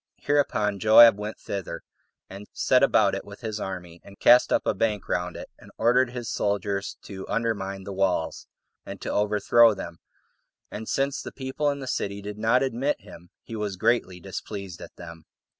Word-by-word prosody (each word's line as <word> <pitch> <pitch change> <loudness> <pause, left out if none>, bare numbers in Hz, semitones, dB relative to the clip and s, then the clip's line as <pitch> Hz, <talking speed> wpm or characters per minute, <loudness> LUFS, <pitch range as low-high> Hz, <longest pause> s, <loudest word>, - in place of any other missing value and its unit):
Hereupon 105 -8 0
Joab 110 +1 +8
went 105 +1 -5
thither, 100 -3 -6 0.4
and 100 +2 -10
set - - +3
about - - +4
it - - -3
with 100 +3 -12
his 110 -2 -4
army, 90 -3 -7
and 100 0 -15
cast 125 +1 +6
up - - +2
a - - +2
bank 105 -1 -1
round 90 0 -2
it, - - -8
and - - -15
ordered 125 +3 +3
his 120 -2 -6
soldiers 100 -1 -2
to 95 -2 -9
undermine 100 -4 -2
the 100 - -7
walls, 95 -4 -1 0.4
and - - -8
to - - -4
overthrow 105 +2 +4
them; 85 -3 -8 0.7
and 110 +1 -6
since 135 0 0
the - - -7
people 135 +2 -2
in 140 -1 -3
the 135 - -6
city 100 -4 -2
did 105 +1 -7
not 115 +4 +3
admit 135 +2 -1
him, 85 +1 -14
he 115 - -8
was 105 -3 -3
greatly 105 -3 +1
displeased 95 0 -7
at - - -11
them. 85 -2 -11
105 Hz, 180 wpm, -25 LUFS, 95-115 Hz, 0.7 s, Joab